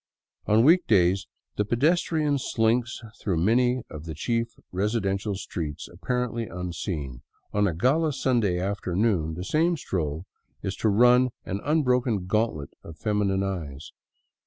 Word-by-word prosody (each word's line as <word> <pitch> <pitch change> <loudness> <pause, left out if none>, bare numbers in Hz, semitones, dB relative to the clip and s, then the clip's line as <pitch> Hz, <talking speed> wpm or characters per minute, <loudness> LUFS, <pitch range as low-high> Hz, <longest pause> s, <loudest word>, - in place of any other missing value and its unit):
On 110 +2 +5
week 170 +5 +5
days 95 -2 +3 0.3
the 105 - +2
pedestrian 150 - +1
slinks 120 0 0 0.2
through 95 -5 0
many 120 +7 +2
of 75 +1 -9
the 80 -2 -6
chief 115 - -1 0.3
resi 105 +5 0
dential 100 0 -1
streets 85 -7 -5
apparently 125 -2 -3
unseen; 85 - -5 0.3
on 105 0 +3
a 85 - -2
gala 150 - +2
Sunday 120 -9 +1
afternoon 95 -3 0
the 90 - -5
same 165 - +2
stroll 80 - -3 0.4
is 95 - -2
to 110 - +1
run 125 +4 +5 0.2
an 100 +2 -3
unbroken 125 - +1
gauntlet 100 -8 -1
of 80 -1 -11
feminine 100 0 0
eyes. 80 -7 -5
105 Hz, 135 wpm, -26 LUFS, 90-125 Hz, 0.4 s, On